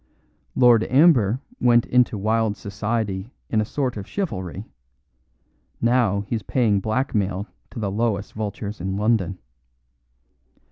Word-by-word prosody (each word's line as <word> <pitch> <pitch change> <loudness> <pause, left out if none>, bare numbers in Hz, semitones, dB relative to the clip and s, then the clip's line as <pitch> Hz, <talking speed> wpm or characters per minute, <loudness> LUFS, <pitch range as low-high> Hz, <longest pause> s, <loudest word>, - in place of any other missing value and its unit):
Lord 120 -3 +6
Amber 130 - +4 0.2
went 120 -1 +4
into 125 -3 +2
wild 110 +1 0
society 100 0 -3 0.2
in 110 - +3
a - - -1
sort 130 -1 -2
of 100 - -6
chivalry; 105 - -4 1.1
now 115 -4 +2
he's 110 +2 -3
paying 105 -1 +1
blackmail 105 -3 -1 0.2
to - - -12
the 105 -3 -2
lowest 105 -1 -1
vultures 105 -1 -5
in 95 +2 -2
London. 105 -3 +1
110 Hz, 120 wpm, -23 LUFS, 100-120 Hz, 1.1 s, Lord